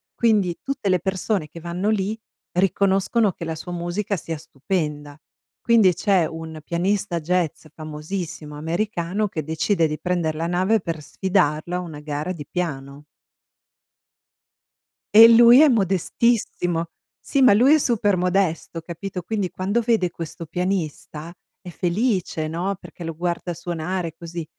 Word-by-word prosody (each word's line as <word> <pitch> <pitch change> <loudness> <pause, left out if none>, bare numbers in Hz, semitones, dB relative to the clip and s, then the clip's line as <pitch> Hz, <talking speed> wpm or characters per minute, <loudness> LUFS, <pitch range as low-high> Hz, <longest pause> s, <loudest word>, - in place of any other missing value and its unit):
quindi 205 -7 +2
tutte 275 -7 -2
le 185 -1 +3
persone 190 -1 -1
che 160 +3 -11
vanno 175 +4 -2
lì 215 0 0 0.4
riconoscono 195 +3 +2
che - - -9
la 160 - -3
sua 170 +3 -8
musica 175 +4 -2
sia 165 0 -5
stupenda. 150 -1 -4 0.4
Quindi 225 -6 +5
c’è 190 -2 +2
un 160 0 -7
pianista 180 +2 -1
jazz 170 -1 -1
famosissimo 155 0 -6
americano 175 +4 -1
che 160 -5 -4
decide 160 +4 +1
di 155 0 -4
prender 175 -3 -1
la 165 +2 -2
nave 185 +5 +2
per 165 -4 -5
sfidarlo 175 -2 0
a - - 0
una 160 -4 -8
gara 150 +3 -4
di 155 -5 -7
piano. 145 -5 -4 2.1
E 225 +1 +11
lui 235 +2 +8
è 310 - +7
modestissimo. 190 - +1 0.3
Sì, 275 - -1
ma 255 -5 +7
lui 255 +8 +6
è - - +5
super 210 -8 +1
modesto, 180 -2 0
capito? 180 +3 -6
Quindi, 205 0 -2
quando 195 +6 -1
vede 225 -6 +1
questo 165 0 -7
pianista 170 -2 -3 0.3
è 190 - -11
felice, 180 -3 -1
no? 175 +5 -2
Perché 175 0 -11
lo 165 0 -4
guarda 175 +1 -3
suonare 170 0 -4
così, 170 0 -6
175 Hz, 140 wpm, -23 LUFS, 160-200 Hz, 2.1 s, E